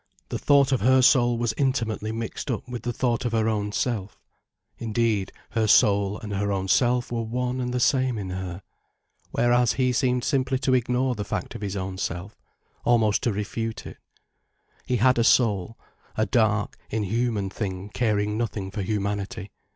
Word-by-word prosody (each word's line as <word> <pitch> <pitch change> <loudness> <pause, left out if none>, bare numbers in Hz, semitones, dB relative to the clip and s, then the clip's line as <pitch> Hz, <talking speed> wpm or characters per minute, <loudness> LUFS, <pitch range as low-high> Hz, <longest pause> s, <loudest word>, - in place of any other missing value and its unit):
The - - -3
thought 140 -2 +4
of 130 - +1
her 130 +3 +5
soul 120 -2 +4
was 120 -1 0
intimately 115 -6 0
mixed 115 +5 -5
up 120 0 -3
with 125 -1 -5
the 120 - -2
thought 120 +1 0
of 120 -2 -2
her 110 -1 +2
own 105 -2 -1
self. 105 -3 -2 0.6
Indeed, 110 -3 0 0.2
her 110 -2 +1
soul 100 -1 +4
and 105 -2 -6
her 100 +1 -1
own 95 -1 -2
self 120 +2 +2
were 120 -1 -1
one 125 +3 -2
and 125 0 -2
the 125 - -1
same 130 -2 +2
in 95 -3 -4
her. 90 0 -5 0.7
Whereas 120 -1 +2
he 125 -1 +1
seemed 125 0 +1
simply 130 -2 +1
to 130 0 0
ignore 125 +1 +1
the 105 -3 -4
fact 100 -3 -4
of - - -8
his 100 -1 -3
own 95 0 -4
self, 90 +5 -4 0.5
almost 110 -4 +3
to 120 - +1
refute 110 +2 -4
it. - - -9 0.9
He 125 - +1
had 125 +1 +3
a - - +4
soul—a 110 -1 0
dark, 110 -4 +1
inhuman 110 -1 -1
thing 95 -1 -4
caring 105 -2 0
nothing 105 -4 -3
for 105 - -4
humanity. 100 -1 -3
115 Hz, 175 wpm, -25 LUFS, 100-125 Hz, 0.9 s, her